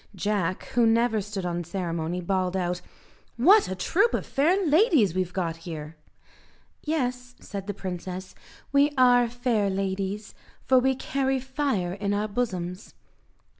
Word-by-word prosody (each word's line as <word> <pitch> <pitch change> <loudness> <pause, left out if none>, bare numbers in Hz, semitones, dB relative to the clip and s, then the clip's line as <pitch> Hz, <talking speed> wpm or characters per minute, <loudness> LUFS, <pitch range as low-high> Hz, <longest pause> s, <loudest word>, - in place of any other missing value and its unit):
Jack, 190 -2 -1
who 235 -1 +3
never 225 -1 +2
stood 200 -2 -5
on 175 0 -2
ceremony, 170 -1 -3
bawled 185 +1 0
out, 180 -1 -2 0.6
"What 390 - +6
a 190 - -3
troop 395 - +2
of - - -3
fair 355 +8 +2
ladies 310 - +4
we've 185 -1 -1
got 170 -3 -2
here!" 160 -2 -7 0.9
"Yes," 250 -5 -2
said 200 -1 -7
the 205 - -3
princess, 185 0 -6 0.4
"we 285 +1 +4
are 245 -1 +5
fair 235 -4 0
ladies, 195 +1 -3 0.3
for 260 -1 +5
we 265 +1 +2
carry 270 0 -1
fire 260 -9 -1
in 200 +1 -1
our 210 +1 0
bosoms." 190 -4 -4
205 Hz, 140 wpm, -26 LUFS, 185-255 Hz, 0.9 s, What